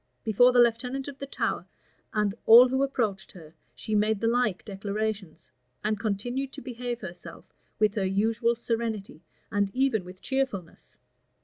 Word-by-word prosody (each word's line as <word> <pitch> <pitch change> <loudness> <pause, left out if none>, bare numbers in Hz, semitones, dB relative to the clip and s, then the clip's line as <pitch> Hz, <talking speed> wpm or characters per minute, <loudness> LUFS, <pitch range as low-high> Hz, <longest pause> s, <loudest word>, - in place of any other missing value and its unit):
Before 245 +3 +5
the 250 - +1
lieutenant 245 +3 +2
of 280 -1 -8
the 275 - -6
Tower, - - -2 0.4
and 210 -2 0
all 240 +3 +9
who 265 +1 0
approached 230 -8 -1
her, 160 -4 -13 0.2
she 215 - -5
made 210 0 +2
the 230 - -2
like 235 -5 +1
declarations; 200 -3 -4 0.3
and 215 0 0
continued 240 +6 -2
to - - -8
behave 245 -1 -5
herself 180 -3 -10 0.2
with 215 -2 +2
her 200 -3 -1
usual 225 +4 +1
serenity, 225 -7 -3 0.3
and 200 -1 +1
even 260 -6 +2
with 180 +1 -12
cheerfulness. 260 -10 -4
220 Hz, 150 wpm, -27 LUFS, 200-245 Hz, 0.4 s, all